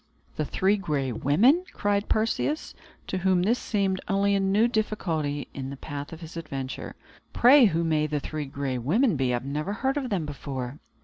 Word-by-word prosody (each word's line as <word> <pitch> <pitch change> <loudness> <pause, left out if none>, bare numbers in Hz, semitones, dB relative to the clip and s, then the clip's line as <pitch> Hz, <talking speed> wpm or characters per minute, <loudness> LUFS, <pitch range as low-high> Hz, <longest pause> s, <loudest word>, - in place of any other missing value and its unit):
"The 155 - -1
Three 195 +7 +2
Gray 145 -9 -1
Women!" 205 - +3
cried 205 0 0
Perseus, 225 +7 0 0.3
to 190 - -3
whom 185 -1 +2
this 230 +6 +2
seemed 195 -3 0
only 200 0 +2
a 200 - +3
new 195 +4 +3
difficulty 165 - -1
in 135 -1 -5
the 140 - -7
path 145 +1 -6
of 165 +1 -9
his 165 +1 -9
adventure; 135 -5 -5 0.4
"pray 260 +2 +7
who 170 -5 +2
may 155 -2 +1
the 150 -1 -1
Three 150 +1 -4
Gray 135 -2 -3
Women 195 - +2
be? 130 -2 +1
I 120 - +1
never 145 +9 -3
heard 265 +6 -1
of 265 -3 -2
them 185 -7 -1
before." 140 -2 -5
165 Hz, 185 wpm, -26 LUFS, 145-205 Hz, 0.4 s, pray